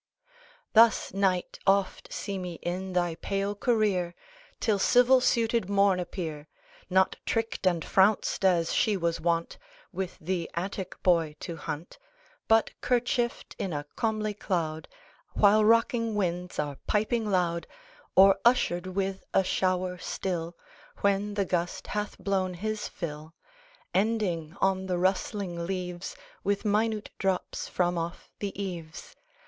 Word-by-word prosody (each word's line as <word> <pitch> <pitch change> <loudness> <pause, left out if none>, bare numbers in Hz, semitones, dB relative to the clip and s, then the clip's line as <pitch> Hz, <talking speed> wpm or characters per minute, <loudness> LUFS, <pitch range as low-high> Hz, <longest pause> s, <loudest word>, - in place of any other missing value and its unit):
Thus, 225 -3 +5
Night, 190 -2 0
oft 195 -1 +1
see 200 -1 -4
me 180 -1 -5
in 185 +2 -3
thy 175 -2 +1
pale 195 +4 -2
career, 205 -6 +1 0.4
Till 210 -3 +1
civil 250 +5 +5
suited 230 -4 +1
Morn 200 -2 +3
appear, 160 -4 -5 0.4
Not 190 0 +3
tricked 225 -4 -1
and 170 -3 +1
frounced, 195 +1 +3
as 175 -3 +3
she 210 -2 +2
was 170 -2 -1
wont 170 0 0 0.3
With 190 -2 -4
the 175 0 -2
Attic 185 +1 -4
boy 165 -4 +3
to 170 - -5
hunt, 160 - -6 0.5
But 225 0 +4
kerchieft 245 -1 0
in 185 - -2
a 145 0 -3
comely 215 -2 -1
cloud 165 -6 -2 0.5
While 210 +1 +5
rocking 230 0 +3
winds 180 -2 -2
are 145 -2 -2
piping 215 +1 +1
loud, 175 -3 0 0.5
Or 195 0 +7
ushered 185 -7 +3
with 190 +1 -2
a 190 - +5
shower 185 -1 0
still, 175 -2 -3 0.4
When 200 +1 +1
the 200 -1 +1
gust 180 +1 -2
hath 210 0 -3
blown 190 -2 -1
his 215 +3 -3
fill, 155 -1 -7 0.6
Ending 190 -5 0
on 190 0 +1
the 180 -1 0
rustling 185 -1 -1
leaves, 180 -1 -4 0.3
With 200 +2 0
minute 215 +1 0
drops 190 -2 -1
from 175 -1 0
off 170 +1 -6
the 200 -1 -4
eaves. 170 -5 -6
190 Hz, 130 wpm, -28 LUFS, 175-210 Hz, 0.6 s, Or